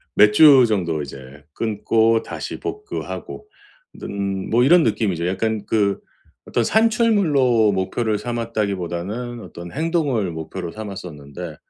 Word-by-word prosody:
몇 105 0 +6
주 135 0 +7
정도 85 -7 -1
이제 70 +1 -11
끊고 115 +1 +1
다시 - - -6
복구하고 420 0 -6 0.5
는 100 -1 -4
뭐 120 +2 +3
이런 170 +4 +6
느낌이죠. 100 -6 0
약간 110 +2 -1
그 100 -3 +1 0.5
어떤 120 - 0
산출물로 185 - +3
목표를 105 +3 -1
삼았다기보다는 110 -1 -3
어떤 85 0 -10
행동을 145 - 0
목표로 85 +2 -6
삼았었는데 90 -6 -8
110 Hz, 275 characters per minute, -21 LUFS, 90-120 Hz, 0.5 s, 주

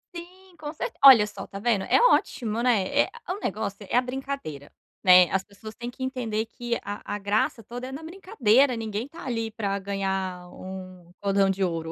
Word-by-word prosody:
Sim, 365 +2 -11
com 300 -1 -6
cer - - -4
olha 255 -6 +10
só 200 -2 -8
tá 195 - -8
vendo? 215 -3 +1
É - - +4
ótimo, 235 - +2
né, 230 -6 +2
é - - 0 0.2
o 385 +3 -2
negócio 200 - -3
é 200 - -1
a 250 - +5
brincadeira, 255 - -6 0.3
né, 180 -1 +7
as 190 0 +1
pessoas 215 +2 -12
têm 240 +1 -6
que 260 - -8
entender 230 -4 -2
que 240 +1 -4
a 205 +1 -6
a - - -5
graça 205 +3 0
toda 245 +4 -7
é - - -8
na 280 +4 -7
brincadeira, 280 - +2
ninguém 220 +2 -4
tá, 330 +4 -11
ali, 225 -3 -2
para 200 -3 -2
gnhar 190 -2 -3
um 185 -2 -10
cordão 195 -1 +2
de 195 0 0
ouro. 165 -2 -2
215 Hz, 195 wpm, -26 LUFS, 195-255 Hz, 0.3 s, olha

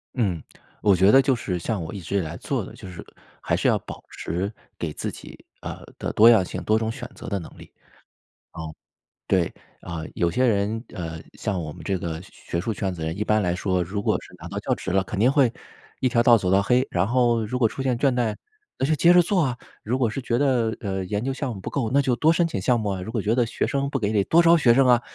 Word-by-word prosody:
嗯， 95 - 0 0.4
我 100 -2 +5
觉 95 +3 +5
得 135 - +7
就 135 -2 +2
是 90 -6 -3
像 100 +1 -2
我 80 - -7
一 100 - -5
直 95 +3 -5
以 - - +3
来 80 -4 -4
做 - - -2
的， - - -11
就 - - -11
是 90 - -9 0.4
还 - - 0
是 - - 0
要 - - +4
保 - - -10
持 90 +6 -3 0.3
给 80 -3 -3
自 - - -4
己， - - -12 0.2
呃， - - -7 0.2
的 - - -2
多 115 +2 +7
样 110 -6 +6
性， - - -6
多 110 +1 +2
种 110 0 -1
选 125 0 -7
择 - - -10
的 100 - -1
能 85 - -10
力。 - - -14 0.8
哦， 80 -1 -7 0.5
对， - - +3 0.4
啊， 85 -2 -6
有 85 -1 +1
些 130 +9 +1
人 110 0 0
呃， 80 -2 -5
像 100 -5 -3
我 75 -2 -5
们 - - -11
这 95 -2 -1
个 80 -1 -4
学 - - -15 0.3
学 - - 0
术 110 +4 -2
圈 95 -2 -2
子 80 - -6
人， 80 +4 -3
一 105 - 0
般 110 0 +2
来 90 -2 0
说 95 -1 0
如 100 +4 -4
果 - - +1
是 - - -15
拿 - - -8
到 - - -4
教 - - 0
职 95 - -5
了， 95 0 +2
肯 100 - -6
定 125 +5 +4
会 135 -5 +4 0.5
一 130 - +2
条 120 0 +3
道 120 -1 +7
儿 - - +5
走 95 -3 -1
到 95 - +5
黑， 125 +5 +2
然 90 +2 +1
后 120 -2 +2
如 125 +4 -3
果 115 - +4
出 135 - -6
现 130 -2 0
倦 135 +1 +2
怠 120 -3 0 0.4
那 130 - 0
就 155 - +2
接 175 +3 +5
着 180 - +7
做 180 +1 +1
啊， 125 -3 -1 0.3
如 120 +4 -1
果 120 -4 +1
是 135 - -4
觉 120 -1 0
得， 125 -5 +1
呃， 95 -3 -3
研 105 +4 -2
究 135 - -1
项 130 -2 -3
目 95 - -9
不 - - -5
够， 125 -6 -1
那 140 - +5
就 130 -2 +1
多 160 +4 +4
申 170 0 +2
请 130 -12 -3
项 120 +5 +2
目 110 -2 -2
啊， 95 -2 -3
如 105 - -6
果 110 - 0
觉 105 +3 +1
得 120 -1 +2
学 115 - -2
生 140 0 -1
不 140 - -1
给 105 -1 0
你 105 -2 +3
多 170 +1 +5
招 170 0 +6
学 120 -6 +5
生 135 +1 +4
啊， 120 -1 +5
110 Hz, 295 characters per minute, -24 LUFS, 95-125 Hz, 0.8 s, 得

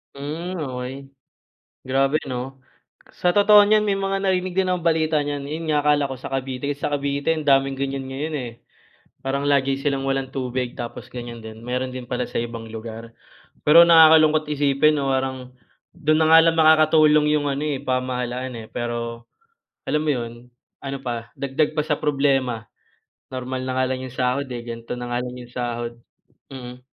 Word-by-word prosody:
Hmm, 160 +6 -5
okey 130 +1 -6 0.7
grabe 135 +3 +2
'no? 130 0 -5 0.6
Sa 180 +1 0
totoo 205 0 +7
niyan 215 0 +4
may 200 -1 +1
mga 195 0 0
narinig 185 -1 0
din 190 -1 +2
ang 180 - -1
balita 160 -2 +2
niyan 145 -1 -3
'yon 155 +3 -5
nga 150 -1 +1
akala 145 -1 +3
ko 135 - -5
sa 130 +2 -9
Cavite 135 +1 -2
sa 145 +1 -3
Cavite 140 +2 -1
ang 155 - -4
daming 135 -1 +3
gan'yan 135 0 -3
ngayon, 150 +4 -4
eh. - - -10 0.7
Parang 140 +1 -1
lagi 135 -1 +2
silang 135 -2 -1
walang 135 -1 -1
tubig 125 -2 -3
tapos 120 -1 -7
gan'yan 120 -1 -8
din 110 +1 -10
meron 125 +1 -2
din 130 -1 -7
pala 125 0 -3
sa - - -4
ibang 115 -1 -4
lugar 115 +1 -8 0.5
pero 165 +3 +8
nakakalungkot 155 -2 +6
isipin 145 +1 +2
'no 135 -1 0
parang 130 -1 -3 0.4
dun 155 -2 +1
na 160 0 +4
nga 165 - +10
lang 165 - -2
makakatulong 155 -1 +5
yung 145 - -2
ano, 140 - -3
eh, 145 -2 -1
pamahalaan, 130 -1 -2
eh, - - -17
pero 120 0 -4 0.6
alam 150 0 +1
mo - - +4
'yon, 120 -4 -3 0.5
ano 135 0 -5
pa 115 -2 -5
dagdag 140 +3 -1
pa 150 - +1
sa 150 -1 -1
problema, 135 -6 +1 0.7
normal 130 0 -4
na 130 - -3
nga 130 - +3
lang 130 0 -3
yung 130 - -6
sahod, 130 +2 0
eh, 120 -1 -5
ganito 115 +1 -6
na 120 0 -4
nga 120 - +1
lang 125 0 -6
'yung 120 0 -12
sahod, 120 -1 -3 0.6
mm. 125 -1 -9
135 Hz, 180 wpm, -22 LUFS, 125-150 Hz, 0.7 s, nga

